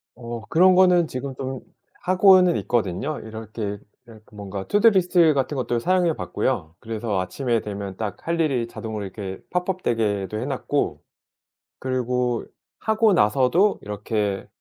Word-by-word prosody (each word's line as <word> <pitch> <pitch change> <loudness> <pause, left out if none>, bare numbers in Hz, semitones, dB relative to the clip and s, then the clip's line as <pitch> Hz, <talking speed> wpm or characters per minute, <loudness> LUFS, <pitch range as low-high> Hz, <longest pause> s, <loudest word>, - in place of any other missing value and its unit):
어 120 -2 -7
그런 185 +3 +5
거는 180 -3 +5
지금 130 0 -5
좀 130 0 -5 0.4
하고는 185 -1 +5
있거든요. 120 - -1
이렇게 110 -2 -6 0.3
이렇게 110 -2 -15
뭔가 100 -2 -6
투두 210 +3 +5
리스트 175 -4 +4
같은 135 +1 -1
것도 120 -2 -1
사용해 180 +4 +2
봤고요. 95 - -2
그래서 110 -3 -3
아침에 115 +6 -1
되면 100 -2 -6
딱 105 -3 -4
할 170 0 0
일이 135 -7 +1
자동으로 110 -3 -6
이렇게 95 -1 -7
팝업 180 +1 -2
되게도 105 -3 -1
해 - - -3
놨고 - - -2 0.8
그리고 125 -2 -1 0.4
하고 220 -1 +3
나서도 135 - +3
이렇게, 105 -1 -3
120 Hz, 310 characters per minute, -23 LUFS, 105-170 Hz, 0.8 s, 그런